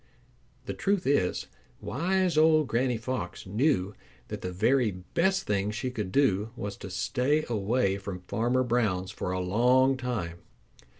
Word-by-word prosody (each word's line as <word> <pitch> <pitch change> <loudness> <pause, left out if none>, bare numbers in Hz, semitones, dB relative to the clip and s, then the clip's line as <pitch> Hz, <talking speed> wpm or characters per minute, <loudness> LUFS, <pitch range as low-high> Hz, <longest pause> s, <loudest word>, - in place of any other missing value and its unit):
The - - -3
truth 200 -2 0
is, 130 -10 +1 0.3
wise 180 - 0
old 155 -1 +5
Granny 120 +1 +1
Fox 115 -6 -4
knew 105 -1 +1 0.4
that - - -5
the 90 - -4
very 120 +6 +2
best 170 - 0
thing 100 0 0
she 120 +4 -3
could 105 -6 -4
do 110 -6 +2
was 100 -4 -5
to 95 - -8
stay 135 +10 0
away 105 -2 0
from 100 -2 -6
Farmer 120 +3 +1
Brown's 105 -6 0
for 90 - -4
a 95 - -1
long 125 +8 +3
time. 105 -10 -3
120 Hz, 145 wpm, -28 LUFS, 95-135 Hz, 0.4 s, old